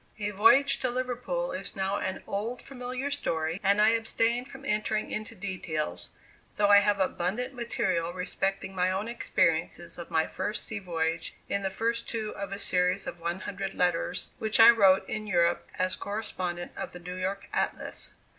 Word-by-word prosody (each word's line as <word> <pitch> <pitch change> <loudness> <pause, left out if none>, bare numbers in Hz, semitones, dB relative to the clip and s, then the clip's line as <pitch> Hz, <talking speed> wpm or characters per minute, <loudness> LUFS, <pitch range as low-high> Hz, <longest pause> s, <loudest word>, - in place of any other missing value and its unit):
A 205 -1 -2
voyage 230 +8 +5
to 255 - 0
Liverpool 255 - -2
is - - -5
now 195 +1 0
an 190 0 -3
old, 220 +5 -3
familiar 255 +1 -5
story, 165 - -1
and 200 +1 +4
I 215 +1 +6
abstain 230 +1 +1
from 270 0 -11
entering 215 -2 0
into 215 +1 -4
details, 175 - -3 0.5
though 205 -1 +4
I 205 0 +9
have 205 0 +2
abundant 195 +7 -1
material 185 -8 -1
respecting 190 +1 -2
my 180 0 +2
own 190 +4 -1
experiences 170 -7 0
of 170 - -7
my 160 0 +2
first 210 +1 -3
sea 220 - -4
voyage 165 -3 -2
in 200 - 0
the 195 - 0
first 230 +4 -1
two 220 -2 -2
of 200 -1 -5
a 195 - -3
series 180 -2 +2
of 170 - -6
one 170 +2 -3
hundred 195 -1 -4
letters 180 +1 0
which 220 +1 +1
I 225 +1 +11
wrote 195 -4 +5
in 215 0 -4
Europe 175 -3 +2
as 185 0 +1
correspondent 185 -4 -4
of - - -5
the 180 - -8
New 180 +1 -7
York 190 +2 -3
Atlas. - - -1
200 Hz, 175 wpm, -29 LUFS, 180-225 Hz, 0.5 s, I